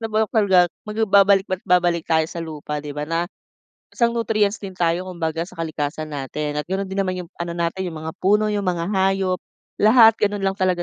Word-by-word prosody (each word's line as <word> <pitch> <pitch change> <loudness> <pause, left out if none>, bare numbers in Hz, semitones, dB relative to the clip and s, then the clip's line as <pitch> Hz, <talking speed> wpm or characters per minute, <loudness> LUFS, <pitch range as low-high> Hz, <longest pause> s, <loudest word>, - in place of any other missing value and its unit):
nabulok 220 -1 -1
talaga, 190 -5 +5 0.2
magbabalik 200 -2 +4
at 185 - -1
babalik 175 -2 +2
tayo 160 -1 +3
sa 170 +1 -7
lupa 150 -2 -5
'di 145 0 -8
ba, 150 - -2
na 165 +2 -2 0.7
isang 235 -1 +2
nutrients 215 -3 0
din 195 -3 -8
tayo 175 +1 0
kumbaga 165 -2 -3
sa 185 - -14
kalikasan 155 -2 -4
natin 150 +1 -4
at 150 - -4
gano'n 190 +1 -3
din 195 - -4
naman 185 -1 0
'yong 170 - -14
ano 170 0 -3
natin, 170 +2 -2
'yong 170 - -5
mga 160 0 -5
puno, 210 +3 +2
'yong 205 -2 -2
mga 175 +1 -1
hayop, 190 -1 +1 0.4
lahat 225 +1 +6
gano'n 205 -1 0
lang 195 0 -1
talaga 185 -2 +1
185 Hz, 200 wpm, -22 LUFS, 165-200 Hz, 0.7 s, lahat